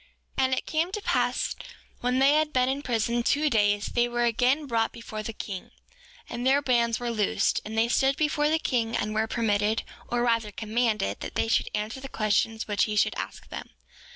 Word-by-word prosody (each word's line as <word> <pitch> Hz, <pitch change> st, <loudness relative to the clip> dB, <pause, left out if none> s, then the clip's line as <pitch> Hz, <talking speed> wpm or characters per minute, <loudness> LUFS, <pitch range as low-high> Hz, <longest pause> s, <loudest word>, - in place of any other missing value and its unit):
7:8 265 Hz, -, +2 dB
And 260 Hz, 0 st, +2 dB
it -, -, -4 dB
came 325 Hz, +3 st, 0 dB
to 420 Hz, -, -3 dB
pass -, -, 0 dB, 0.4 s
when 250 Hz, +1 st, 0 dB
they 270 Hz, +2 st, +5 dB
had 305 Hz, 0 st, +2 dB
been 255 Hz, -2 st, +2 dB
in 270 Hz, +2 st, -1 dB
prison 235 Hz, -2 st, 0 dB
two 290 Hz, +5 st, +2 dB
days 205 Hz, -2 st, +2 dB
they 240 Hz, 0 st, +3 dB
were 240 Hz, 0 st, -1 dB
again 250 Hz, +5 st, +2 dB
brought 230 Hz, -4 st, 0 dB
before 220 Hz, -2 st, -7 dB
the 220 Hz, -, -4 dB
king, 195 Hz, -3 st, -7 dB, 0.6 s
and 240 Hz, 0 st, -5 dB
their 265 Hz, +2 st, +4 dB
bands 235 Hz, -4 st, +1 dB
were 240 Hz, -1 st, -2 dB
loosed; 215 Hz, -3 st, +1 dB
and 220 Hz, +1 st, -6 dB
they 225 Hz, +1 st, +4 dB
stood 270 Hz, +3 st, +2 dB
before 300 Hz, -1 st, +1 dB
the 320 Hz, -, +3 dB
king, 235 Hz, -7 st, -1 dB
and 215 Hz, -, -2 dB
were 220 Hz, +1 st, +1 dB
permitted, 215 Hz, -2 st, +1 dB, 0.2 s
or 240 Hz, 0 st, 0 dB
rather 230 Hz, -3 st, +1 dB
commanded, 220 Hz, 0 st, -1 dB
that -, -, -7 dB
they -, -, +1 dB
should 225 Hz, -, +1 dB
answer 215 Hz, +5 st, -3 dB
the 270 Hz, 0 st, -8 dB
questions 220 Hz, +1 st, 0 dB
which 205 Hz, -1 st, +2 dB
he 215 Hz, -, -3 dB
should -, -, +3 dB
ask -, -, -6 dB
them. -, -, -7 dB
235 Hz, 210 wpm, -27 LUFS, 220-265 Hz, 0.6 s, they